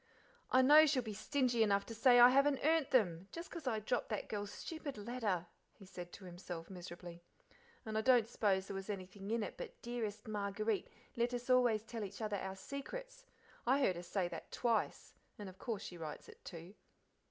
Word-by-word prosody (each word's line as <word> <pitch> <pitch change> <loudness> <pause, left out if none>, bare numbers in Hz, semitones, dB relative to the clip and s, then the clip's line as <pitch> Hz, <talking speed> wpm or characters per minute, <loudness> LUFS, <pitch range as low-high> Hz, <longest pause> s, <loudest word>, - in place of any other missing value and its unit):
"I 260 0 +5
know 305 +4 +8
she'll 270 -4 +2
be 220 -2 -5
stingy 245 +2 +1
enough 200 -2 +3
to 230 - -7
say 245 +2 +6
I 240 +1 +10
haven't 275 +1 +3
earned 320 -2 +4
them, 185 -8 +2
just 335 +1 -7
'cause 330 -5 -6
I 225 -3 +1
dropped 235 +3 -1
that 215 - -3
girl's 205 -1 -3
stupid 315 -6 -6
letter," 210 -5 -2 0.3
he 195 - -13
said 180 -2 -8
to 200 - -10
himself, 175 -1 -7
miserably, 175 -1 -9 0.6
"and 220 -1 -4
I 220 - +2
don't 245 -2 +5
suppose 195 -5 +1
there 195 - -6
was 195 +1 -6
anything 195 0 -6
in 230 0 +1
it - - -6
but - - -8
'Dearest 235 -4 -4
Marguerite, 210 0 -1 0.3
let 240 +1 +1
us 245 +1 -2
always 240 -4 +4
tell 225 -1 -5
each 200 0 -7
other 210 -2 -1
our 190 0 -4
secrets'; - - -7 0.4
I 265 +3 +4
heard 190 -9 +3
her 175 - -5
say 180 +1 -1
that - - -8
twice, 230 -3 0 0.2
and 205 - -7
of 185 0 -11
course 220 -4 -3
she 175 - -8
writes 155 -2 -6
it, - - -15
too." 170 +3 -9
215 Hz, 200 wpm, -37 LUFS, 195-250 Hz, 0.6 s, I